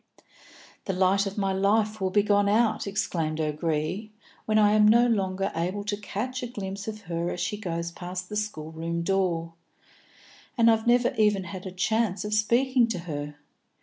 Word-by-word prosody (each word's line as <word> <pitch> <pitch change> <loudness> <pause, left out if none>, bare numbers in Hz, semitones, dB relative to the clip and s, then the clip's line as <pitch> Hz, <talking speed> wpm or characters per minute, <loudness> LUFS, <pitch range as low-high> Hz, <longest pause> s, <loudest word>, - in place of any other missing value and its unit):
"The 195 - -1
light 190 +2 +2
of 195 - -6
my 195 -1 0
life 210 +2 +1
will 190 - +1
be 205 +2 +3
gone 205 -1 +3
out," 220 0 +2
exclaimed 170 -6 -2
O'Gree, 155 +6 -2 0.3
"when 215 0 +2
I 210 -1 +5
am 210 0 +5
no 235 +3 +6
longer 195 -4 0
able 180 +5 -2
to 205 0 -2
catch 215 +5 -4
a 245 - -3
glimpse 200 -3 -6
of 215 -1 -5
her 170 -2 -3
as 180 - -4
she 195 - -1
goes 170 -5 -4
past 180 +1 -6
the 210 - -7
schoolroom 165 -4 -3
door. 170 -3 0 1.0
And 230 -1 +6
I've 220 0 0
never 245 0 +3
even 210 -3 +3
had 185 +1 -7
a - - -6
chance 205 +2 0
of 210 - -3
speaking 235 +3 +3
to 225 -6 -3
her. 150 -3 -5
200 Hz, 180 wpm, -26 LUFS, 175-215 Hz, 1.0 s, no